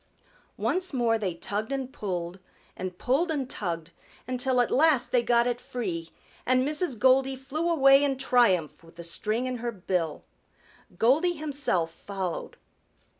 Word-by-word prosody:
Once 365 -2 0
more 235 -3 +2
they 185 -5 -2
tugged 205 +7 -4
and 265 -1 -3
pulled 180 -6 -4 0.4
and 185 -1 -6
pulled 280 - +1
and 285 -5 -1
tugged 170 -8 -4 0.4
until 255 0 0
at 245 - +2
last 275 -5 +3
they 245 - +4
got 235 0 +3
it 245 0 -1
free, 175 -9 -4 0.3
and 255 +1 +2
Mrs. 300 -3 0
Goldy 265 +3 +4
flew 285 +6 -3
away 275 -3 +6
in 275 -2 +1
triumph 235 - +2
with 165 0 -17
the 170 - -9
string 215 +8 -1
in 255 -1 -2
her 240 0 -3
bill. 180 -6 -2 0.7
Goldy 295 - +3
himself 285 - -1
followed. 190 -1 -5
245 Hz, 150 wpm, -27 LUFS, 185-270 Hz, 0.7 s, away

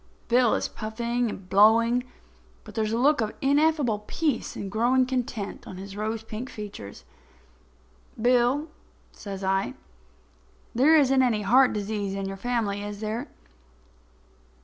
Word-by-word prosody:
Bill 245 -1 +4
is - - -1
puffing 235 +2 -2
and 195 -3 -8
blowing, 230 +5 +4 0.6
but 215 - -12
there 220 +1 0
is 215 - -2
a 225 - 0
look 280 +2 +3
of 215 -1 -2
ineffable 285 -5 +2
peace 300 -8 -1
and 195 -1 -5
growing 245 +4 +3
content 250 -5 -4
on 185 - -8
his 195 +1 -8
rose 215 +1 -3
pink 225 +3 -6
features. 105 - -9 1.1
"Bill," 250 +5 +2 0.4
says 195 -1 -8
I, 195 +6 0 1.0
"there 275 +7 +5
isn't 270 -2 +4
any 225 -5 +1
heart 255 +5 +5
disease 205 -1 -3
in 195 0 -3
your 195 0 -4
family, 215 -3 -1
is 205 0 -6
there? 220 +6 -3
225 Hz, 140 wpm, -26 LUFS, 205-250 Hz, 1.1 s, there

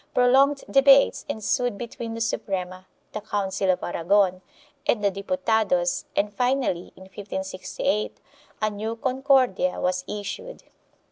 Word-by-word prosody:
Prolonged 270 +3 +4
debates 275 +1 +5
ensued 245 -2 -1
between 230 0 -6
the 230 - -5
Suprema, 185 -4 -3 0.2
the 215 - -5
Council 195 -2 -2
of 185 - +1
Aragon 185 +2 +1 0.5
and 210 -3 +1
the 200 - +3
Diputados 200 -4 0
and 205 +1 0
finally, 250 -6 0
in 190 - -13
1568, 190 +1 -3 0.4
a 215 - +3
new 215 +2 -4
Concordia 255 -6 +1
was 180 0 0
issued. 210 - -6
210 Hz, 120 wpm, -25 LUFS, 190-250 Hz, 0.5 s, debates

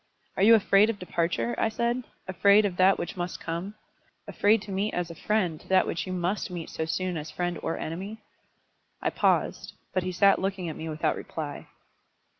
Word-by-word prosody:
"Are - - -2
you 225 +3 +8
afraid 210 0 +4
of 225 - -2
departure?" 165 -10 -1
I 225 - +2
said, 235 +3 -1 0.2
"afraid 200 +3 +5
of 190 -3 -1
that 190 +1 +5
which - - -4
must 175 -1 -4
come; 170 +5 -5 0.5
afraid 210 +1 +2
to 205 - -8
meet 195 +3 -1
as 175 -1 -2
a - - -7
friend 180 -3 -1
that 190 0 +4
which 170 - -3
you - - -4
must 185 +2 -1
meet 175 -3 -6
so 160 - -3
soon 180 +2 -2
as 155 0 -6
friend 175 -2 -3
or 165 - -2
enemy?" 190 +7 -5 0.8
I - - -1
paused; - - 0 0.2
but 185 - +1
he 185 +1 -3
sat 195 +2 +4
looking 190 -2 -2
at 155 - -6
me 160 - -6
without 155 0 0
reply. - - -6
185 Hz, 195 wpm, -27 LUFS, 170-200 Hz, 0.8 s, you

